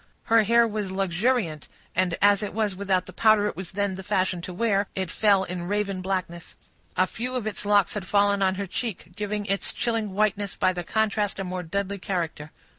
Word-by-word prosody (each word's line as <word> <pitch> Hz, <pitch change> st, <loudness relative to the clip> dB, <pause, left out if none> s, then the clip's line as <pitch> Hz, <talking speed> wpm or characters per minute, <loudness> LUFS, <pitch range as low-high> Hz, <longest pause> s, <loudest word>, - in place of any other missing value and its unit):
Her 230 Hz, 0 st, +5 dB
hair 235 Hz, +2 st, +5 dB
was 210 Hz, -3 st, -3 dB
luxuriant, 190 Hz, -, 0 dB, 0.3 s
and 180 Hz, -2 st, +1 dB
as 205 Hz, -1 st, +5 dB
it 205 Hz, -1 st, -4 dB
was 215 Hz, -3 st, 0 dB
without 190 Hz, -1 st, 0 dB
the -, -, -10 dB
powder 215 Hz, -2 st, +4 dB
it 210 Hz, -, -2 dB
was 185 Hz, 0 st, -7 dB
then 200 Hz, 0 st, 0 dB
the 190 Hz, -, -6 dB
fashion 185 Hz, -3 st, 0 dB
to 180 Hz, -, -6 dB
wear, 200 Hz, 0 st, +1 dB
it 190 Hz, -2 st, -2 dB
fell 200 Hz, -3 st, +3 dB
in 175 Hz, -1 st, -5 dB
raven 200 Hz, -1 st, -1 dB
blackness. 185 Hz, -3 st, -4 dB, 0.4 s
A 185 Hz, -, +5 dB
few 250 Hz, +6 st, -4 dB
of 245 Hz, -4 st, -2 dB
its 215 Hz, -1 st, -4 dB
locks 205 Hz, -2 st, +4 dB
had 200 Hz, -3 st, -5 dB
fallen 200 Hz, 0 st, +3 dB
on 190 Hz, -1 st, +3 dB
her 200 Hz, +1 st, -3 dB
cheek, 190 Hz, -3 st, -4 dB
giving 210 Hz, 0 st, -3 dB
its 195 Hz, 0 st, 0 dB
chilling 225 Hz, -4 st, -1 dB
whiteness 205 Hz, -1 st, 0 dB
by 185 Hz, -, +2 dB
the 175 Hz, -1 st, -4 dB
contrast 210 Hz, +1 st, 0 dB
a 195 Hz, -, -3 dB
more 185 Hz, 0 st, -4 dB
deadly 200 Hz, +3 st, -3 dB
character. 170 Hz, -5 st, -3 dB
Dr. 155 Hz, -, -17 dB
200 Hz, 210 wpm, -26 LUFS, 185-210 Hz, 0.4 s, Her